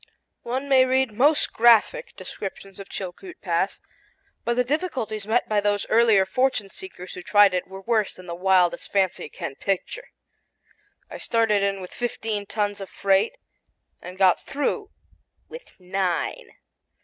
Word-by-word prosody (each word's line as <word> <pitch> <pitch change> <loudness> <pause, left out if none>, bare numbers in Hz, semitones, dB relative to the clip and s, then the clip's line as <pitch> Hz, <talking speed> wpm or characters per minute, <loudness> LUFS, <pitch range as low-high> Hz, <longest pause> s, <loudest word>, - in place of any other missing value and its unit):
One 260 +4 -3
may 265 -2 +6
read 260 -1 +1
most 285 +7 +3
graphic 240 - +4
descriptions 195 0 -8
of 195 - -9
Chilkoot 200 - -7
Pass; - - -1 0.6
but 235 - 0
the 250 - +2
difficulties 250 - -3
met 230 +3 +1
by 210 -1 +1
those 205 0 0
earlier 220 -4 +5
fortune 220 -1 0
seekers 190 - -9
who 180 - -7
tried 205 +1 +5
it 180 - -1
were 190 +1 -9
worse 220 0 0
than 185 - -13
the 170 - -6
wildest 180 0 +2
fancy 190 -5 0
can 135 - -6
picture. 200 - -3 1.0
I - - -6
started 225 -3 +1
in 195 -1 -1
with 180 - -9
fifteen 220 -4 -3
tons 205 -2 -2
of 195 - -7
freight 200 - +1 0.6
and 180 +1 -9
got 190 -2 +4
through 390 +9 -2 0.6
with 485 - -12
nine. 185 -1 -2
205 Hz, 150 wpm, -24 LUFS, 190-250 Hz, 1.0 s, may